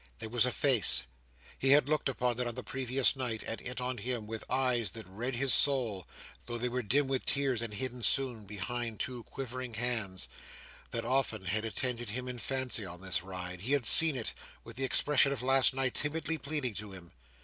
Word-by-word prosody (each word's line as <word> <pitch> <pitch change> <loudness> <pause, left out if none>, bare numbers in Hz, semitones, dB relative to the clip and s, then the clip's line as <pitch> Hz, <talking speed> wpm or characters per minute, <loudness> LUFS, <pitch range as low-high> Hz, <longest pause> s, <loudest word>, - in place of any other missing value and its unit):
There 110 - -7
was 120 +1 +3
a - - +1
face—he 65 - 0
had 140 0 +6
looked 155 -2 0
upon 125 -2 -1
it, 125 - -1
on 120 - -4
the - - -6
previous 130 0 +1
night, 120 -4 -3
and 115 - -5
it 125 +1 -5
on 125 -1 -3
him 120 0 -2
with 110 +1 -6
eyes 125 -3 +1
that 110 -2 -8
read 115 +8 -4
his 135 +2 +2
soul, 120 -10 +2 0.4
though 120 -1 -3
they 125 +1 -2
were 125 +1 -2
dim 135 +6 +1
with 130 -1 -2
tears, 135 -5 +1
and 115 -2 -4
hidden 125 +4 -4
soon 120 -2 -1
behind 115 +2 -5
two 125 -2 -4
quivering 130 -2 -7
hands—that 110 -6 -5
often 125 -7 0
had 105 +4 -2
attended 120 +1 -2
him 125 +4 -4
in 125 -1 -6
fancy, 130 -3 -1
on 90 -1 -8
this 95 -4 -1
ride. 90 -1 -7
He 125 +8 -1
had 140 -4 +1
seen 160 +4 +10
it, 120 -4 -4 0.3
with - - -12
the 135 - -1
expression 140 +2 +4
of 135 -3 -4
last 135 0 +4
night, 130 -1 -1
timidly 160 +2 -1
pleading 140 -4 -2
to 105 -1 -7
him. 90 -2 -12
125 Hz, 200 wpm, -31 LUFS, 110-130 Hz, 0.4 s, seen